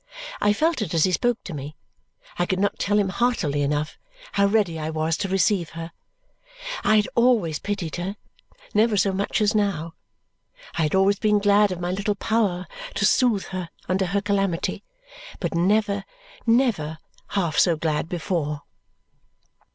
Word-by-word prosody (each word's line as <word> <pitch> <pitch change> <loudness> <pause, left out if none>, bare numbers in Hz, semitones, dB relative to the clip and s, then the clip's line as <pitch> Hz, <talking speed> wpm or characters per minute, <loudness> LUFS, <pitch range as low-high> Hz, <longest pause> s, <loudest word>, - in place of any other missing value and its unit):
I 205 - +4
felt 310 +5 +1
it 175 -5 -2
as 160 - +4
he 185 - +3
spoke 240 +5 0
to 180 - -7
me. 145 +1 -6 0.6
I 175 - +1
could 185 - 0
not 205 +1 0
tell 205 +1 +1
him 200 -2 +2
heartily 190 -10 0
enough 145 +2 -1 0.3
how 200 0 +3
ready 200 -6 +1
I 155 0 -3
was 160 0 0
to - - -2
receive 190 -2 +2
her. 165 0 -6 0.9
I 215 - +4
had 210 -1 +3
always 230 -11 +3
pitied 190 -6 -3
her, 185 +3 -3 0.6
never 215 0 +3
so 195 +1 +3
much 200 +3 -1
as 210 +1 +3
now. 185 -6 0 0.8
I - - -1
had 155 +3 +1
always 195 +1 +3
been 210 -1 +3
glad 205 0 +4
of 180 - -4
my 175 0 -2
little 200 +2 -1
power 200 -4 0 0.3
to - - +2
soothe 235 -7 +3
her 185 -3 -4 0.2
under 185 +1 +1
her 200 +3 0
calamity, 195 -3 -1 0.6
but - - -2
never, 200 +3 +2 0.4
never, 225 - +2 0.3
half 175 -6 0
so 170 -3 +4
glad 155 0 -1
before. 155 -4 -2
195 Hz, 165 wpm, -24 LUFS, 165-210 Hz, 0.9 s, I